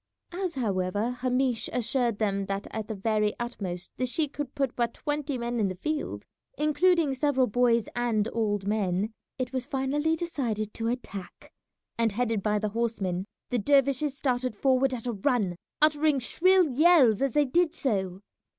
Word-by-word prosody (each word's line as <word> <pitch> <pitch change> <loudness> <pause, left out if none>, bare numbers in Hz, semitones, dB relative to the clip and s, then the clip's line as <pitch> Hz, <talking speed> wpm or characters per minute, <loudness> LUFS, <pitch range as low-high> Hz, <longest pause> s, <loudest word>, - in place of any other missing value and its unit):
As, 360 -1 -3
however, 205 -1 -1
Hamish 250 -1 0
assured 245 -2 0
them 200 -2 -1
that 195 0 -3
at 220 -1 -4
the 220 - -4
very 210 +1 +1
utmost 195 -7 -4
the 255 - 0
sheik 295 +3 0
could 290 -3 -5
put 275 -3 -1
but 235 -1 -1
twenty 295 -2 -2
men 240 0 -2
in 210 - +2
the 185 - -4
field, 305 +11 -3 0.3
including 305 0 +3
several 265 -1 +2
boys 235 -1 +2
and 230 -3 +1
old 205 -3 0
men, 205 0 0 0.2
it 255 0 -3
was 255 -1 -3
finally 290 +3 0
decided 245 -11 -3
to 225 - -3
attack, 215 -6 -6 0.5
and 225 -3 +2
headed 225 -2 0
by 210 +1 +1
the 210 0 -1
horsemen 200 -5 -2 0.2
the 245 - +1
dervishes 275 +3 +2
started 255 -3 -1
forward 265 +3 +2
at 235 - -8
a 240 - -1
run, 205 -4 0 0.3
uttering 305 -1 +4
shrill 365 +7 +3
yells 280 - +5
as 275 -3 +1
they 295 -1 +4
did 335 +4 +1
so. 195 - -1
245 Hz, 165 wpm, -28 LUFS, 210-280 Hz, 0.5 s, yells